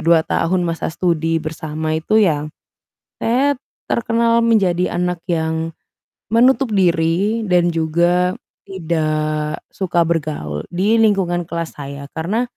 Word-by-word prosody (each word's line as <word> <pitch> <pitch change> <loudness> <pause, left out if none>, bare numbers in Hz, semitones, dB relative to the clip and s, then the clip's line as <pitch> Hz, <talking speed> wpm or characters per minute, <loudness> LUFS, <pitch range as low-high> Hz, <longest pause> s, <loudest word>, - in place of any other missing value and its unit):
2 165 -1 +5
tahun 180 +2 +1
masa 165 -1 -2
studi 165 -2 0
bersama 155 -1 -3
itu 215 +7 +2
ya 155 -7 +2 0.8
saya 270 +5 +2 0.4
terkenal 230 0 +2
menjadi 185 -6 +2
anak 180 -1 -1
yang 160 -1 -1 0.6
menutup 255 +1 +4
diri 185 +4 +2
dan 175 -1 +3
juga, 175 +3 +2 0.3
tidak 155 -4 -2
suka 175 -3 +1
bergaul 150 - -2
di 200 +6 +2
lingkungan 180 -5 +1
kelas 170 0 -4
saya. 140 0 -7
Karena 195 +10 -1
170 Hz, 115 wpm, -19 LUFS, 160-195 Hz, 0.8 s, 2